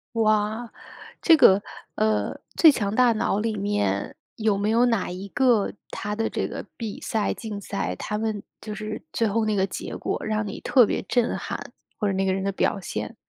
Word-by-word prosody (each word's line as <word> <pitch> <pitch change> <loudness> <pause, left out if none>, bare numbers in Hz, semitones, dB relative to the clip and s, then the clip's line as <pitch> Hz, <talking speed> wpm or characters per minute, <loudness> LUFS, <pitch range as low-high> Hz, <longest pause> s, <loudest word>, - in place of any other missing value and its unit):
哇， 215 +1 +1 0.5
这 330 - +7
个， 200 -9 +6 0.3
呃， 105 -1 +1 0.2
《最 320 - +8
强 205 -6 -1
大 250 -1 +5
脑》 215 -2 0
里 220 -1 -1
面， 100 - -1 0.2
有 215 -2 +1
没 205 +1 0
有 230 +2 +4
哪 230 -7 0
一 185 +2 -6
个 240 -1 +2 0.2
他 210 0 -4
的 225 +1 -1
这 - - -2
个 - - -6
比 220 -3 -5
赛、 220 -2 0
竞 215 -3 -6
赛， 200 0 -3
他 210 - -3
们 215 -1 -2 0.2
就 215 - -6
是 215 +1 -5
最 230 - +1
后 220 +2 +1
那 215 - +1
个 190 0 +2
结 - - -6
果 - - -2
让 215 -1 -1
你 - - -6
特 250 -4 +5
别 - - -1
震 245 -2 +1
撼， - - -6 0.3
或 210 - +1
者 195 - +1
那 190 0 0
个 190 - +2
人 190 - -1
的 195 - +1
表 200 - +1
现。 185 - -5
215 Hz, 215 characters per minute, -25 LUFS, 200-225 Hz, 0.5 s, 最